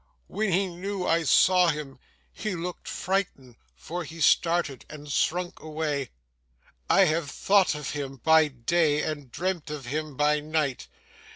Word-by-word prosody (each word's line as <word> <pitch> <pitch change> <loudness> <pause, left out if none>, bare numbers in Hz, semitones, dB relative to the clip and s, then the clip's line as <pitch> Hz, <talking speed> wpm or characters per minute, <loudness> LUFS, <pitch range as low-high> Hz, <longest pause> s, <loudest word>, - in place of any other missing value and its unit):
When 210 0 -2
he 190 +3 +2
knew 185 +1 -4
I 165 0 +2
saw 180 +3 +5
him, 150 -5 -3 0.3
he 215 -4 -4
looked 175 +1 -6
frightened; 175 -10 -2 0.2
for 170 - -6
he 165 +1 -10
started, 165 -4 +2
and 150 -1 -10
shrunk 175 +5 0
away. 150 -3 -3 0.8
I - - +5
have 160 -4 +2
thought 195 -2 +3
of 150 -2 -5
him 140 -2 -5
by 160 +3 +5
day, 150 +4 +1
and 145 -5 -5
dreamt 180 -4 -3
of 150 -3 -6
him 150 +2 -4
by 150 0 +3
night. 150 -3 -2
155 Hz, 150 wpm, -26 LUFS, 145-180 Hz, 0.8 s, saw